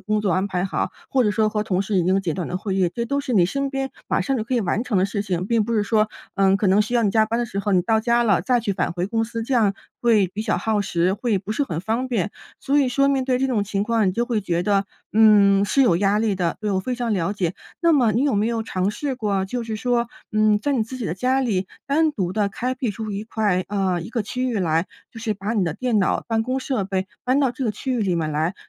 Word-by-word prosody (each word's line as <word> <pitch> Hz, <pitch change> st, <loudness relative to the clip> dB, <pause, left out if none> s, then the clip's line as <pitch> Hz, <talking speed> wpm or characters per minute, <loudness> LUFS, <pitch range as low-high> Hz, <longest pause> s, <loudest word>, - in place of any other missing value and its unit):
工 215 Hz, 0 st, 0 dB
作 200 Hz, -3 st, 0 dB
安 190 Hz, +2 st, 0 dB
排 180 Hz, 0 st, -1 dB
好， 195 Hz, -, -2 dB, 0.2 s
或 265 Hz, -, +2 dB
者 210 Hz, -, +2 dB
说 215 Hz, 0 st, +2 dB
和 210 Hz, 0 st, -1 dB
同 195 Hz, -3 st, 0 dB
事 205 Hz, +1 st, -3 dB
已 180 Hz, -, +3 dB
经 190 Hz, +2 st, +2 dB
简 170 Hz, -5 st, -2 dB
短 180 Hz, -4 st, -4 dB
的 180 Hz, -, -2 dB
会 195 Hz, -1 st, -3 dB
议， 185 Hz, -3 st, +2 dB
这 235 Hz, -, -2 dB
都 280 Hz, +4 st, -1 dB
是 260 Hz, -, -4 dB
你 180 Hz, -5 st, +4 dB
身 275 Hz, +5 st, -2 dB
边 270 Hz, -1 st, -3 dB, 0.2 s
马 -, -, +1 dB
上 270 Hz, -1 st, 0 dB
就 220 Hz, -, -1 dB
可 250 Hz, +3 st, -3 dB
以 -, -, +2 dB
完 200 Hz, +3 st, 0 dB
成 215 Hz, -7 st, 0 dB
的 185 Hz, -, +3 dB
事 200 Hz, 0 st, -3 dB
情， 185 Hz, -2 st, -2 dB
并 230 Hz, 0 st, +2 dB
不 235 Hz, -, -3 dB
是 210 Hz, -, +2 dB
说， 215 Hz, 0 st, +2 dB, 0.3 s
呃， 195 Hz, 0 st, +3 dB
可 205 Hz, -, 0 dB
能 190 Hz, +2 st, +4 dB
需 240 Hz, +4 st, -4 dB
要 235 Hz, -, +3 dB
你 205 Hz, -, +2 dB
加 220 Hz, +1 st, +4 dB
班 230 Hz, +2 st, -1 dB
的 240 Hz, -, 0 dB
时 200 Hz, -, -5 dB
候 200 Hz, 0 st, -1 dB
你 185 Hz, -, +4 dB
到 220 Hz, +3 st, +2 dB
家 235 Hz, +1 st, +2 dB
了 200 Hz, -6 st, +3 dB
再 250 Hz, +4 st, +2 dB
去 205 Hz, -3 st, -1 dB
返 185 Hz, -3 st, -1 dB
回 175 Hz, +1 st, -2 dB
公 225 Hz, +1 st, 0 dB
司， 230 Hz, 0 st, -5 dB
这 255 Hz, -, -4 dB
样 210 Hz, -4 st, +3 dB, 0.3 s
会 220 Hz, -5 st, +4 dB
比 210 Hz, +4 st, -5 dB
较 215 Hz, -, 0 dB
耗 220 Hz, -2 st, 0 dB
时， 180 Hz, -2 st, +1 dB
会 210 Hz, -1 st, 0 dB
不 200 Hz, +3 st, -5 dB
是 285 Hz, -, 0 dB
很 165 Hz, -, -4 dB
方 225 Hz, +7 st, -2 dB
便。 210 Hz, -6 st, -1 dB, 0.3 s
所 285 Hz, +2 st, +1 dB
以 265 Hz, -, +2 dB
说 275 Hz, +2 st, +2 dB
面 270 Hz, -2 st, +1 dB
对 255 Hz, -1 st, +1 dB
这 270 Hz, -, +1 dB
种 240 Hz, -6 st, 0 dB
情 200 Hz, 0 st, -1 dB
况， 225 Hz, -2 st, +1 dB
你 -, -, 0 dB
就 235 Hz, +5 st, 0 dB
会 235 Hz, -3 st, -1 dB
觉 175 Hz, -3 st, -1 dB
得， 200 Hz, +1 st, +2 dB, 0.3 s
嗯， 205 Hz, -2 st, +6 dB
是 275 Hz, +7 st, +3 dB
有 225 Hz, -9 st, +4 dB
压 200 Hz, +1 st, +2 dB
力 215 Hz, -2 st, +1 dB
的， 175 Hz, -3 st, -1 dB
对， 210 Hz, -1 st, -1 dB
我 190 Hz, -, +1 dB
非 250 Hz, +6 st, -3 dB
常 240 Hz, -2 st, -2 dB
了 190 Hz, 0 st, 0 dB
解。 180 Hz, -3 st, -1 dB, 0.3 s
那 335 Hz, -1 st, +4 dB
么 245 Hz, -7 st, +3 dB
你 235 Hz, +6 st, +1 dB
有 285 Hz, -, +1 dB
没 205 Hz, +2 st, +2 dB
有 230 Hz, -1 st, -1 dB
尝 190 Hz, -3 st, -1 dB
试 275 Hz, +5 st, -3 dB
过， 200 Hz, -6 st, -1 dB
就 240 Hz, +5 st, -3 dB
是 225 Hz, -1 st, -4 dB
说， 240 Hz, 0 st, 0 dB, 0.2 s
嗯， 215 Hz, -1 st, +3 dB
在 285 Hz, +6 st, -1 dB
你 240 Hz, -5 st, +1 dB
自 245 Hz, +4 st, -7 dB
己 245 Hz, -, -5 dB
的 165 Hz, -, -2 dB
家 255 Hz, +7 st, +1 dB
里 195 Hz, -7 st, 0 dB, 0.2 s
单 310 Hz, +3 st, +2 dB
独 185 Hz, -8 st, -2 dB
地 205 Hz, -1 st, +1 dB
开 255 Hz, +5 st, -3 dB
辟 250 Hz, -3 st, -2 dB
出 215 Hz, 0 st, -5 dB
一 200 Hz, +1 st, -4 dB
块 210 Hz, -5 st, 0 dB
呃， 190 Hz, -3 st, 0 dB
一 170 Hz, -, -7 dB
个 230 Hz, -2 st, -2 dB
区 255 Hz, +5 st, -2 dB
域 230 Hz, -, -1 dB
来， 165 Hz, -1 st, +1 dB, 0.3 s
就 225 Hz, -, -9 dB
是 220 Hz, -2 st, -1 dB
把 200 Hz, +2 st, -3 dB
你 215 Hz, -4 st, +1 dB
的 160 Hz, -3 st, -2 dB
电 245 Hz, -1 st, 0 dB
脑、 190 Hz, -, +1 dB
办 225 Hz, -1 st, 0 dB
公 255 Hz, +3 st, -1 dB
设 255 Hz, -7 st, -1 dB
备 190 Hz, 0 st, -2 dB, 0.2 s
搬 255 Hz, +3 st, +2 dB
到 270 Hz, -3 st, +2 dB
这 255 Hz, +2 st, -6 dB
个 225 Hz, -, +1 dB
区 260 Hz, +5 st, -4 dB
域 245 Hz, -, 0 dB
里 190 Hz, -3 st, +1 dB
面 160 Hz, -2 st, -1 dB
来， 160 Hz, +5 st, 0 dB
215 Hz, 320 characters per minute, -22 LUFS, 195-240 Hz, 0.3 s, 嗯